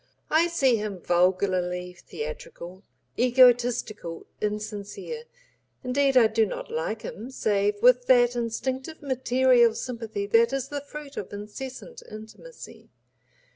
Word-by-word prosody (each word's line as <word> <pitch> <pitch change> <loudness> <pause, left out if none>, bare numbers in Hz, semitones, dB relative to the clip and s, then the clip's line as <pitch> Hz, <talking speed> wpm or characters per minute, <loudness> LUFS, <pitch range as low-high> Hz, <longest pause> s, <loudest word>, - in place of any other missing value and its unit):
I 320 +2 +4
see 270 -8 +2
him 210 -2 -4
vulgarly 180 0 0
theatrical, 450 - -8 0.4
egotistical, 245 -7 +3 0.2
insincere, 210 - -5 0.6
indeed 270 +1 +2
I 240 - +7
do 220 +1 +2
not 210 - -5
like 215 +8 -3
him 225 +5 -7
save 205 -5 0
with 250 0 +5
that 245 -1 +5
instinctive 260 +6 -3
material 255 -3 +3
sympathy 225 -5 -4
that 230 +5 +3
is 275 -1 -2
the 290 -1 -4
fruit 285 0 -10
of 195 - -5
incessant 255 - -8
intimacy. 220 - -12
235 Hz, 115 wpm, -26 LUFS, 205-265 Hz, 0.6 s, I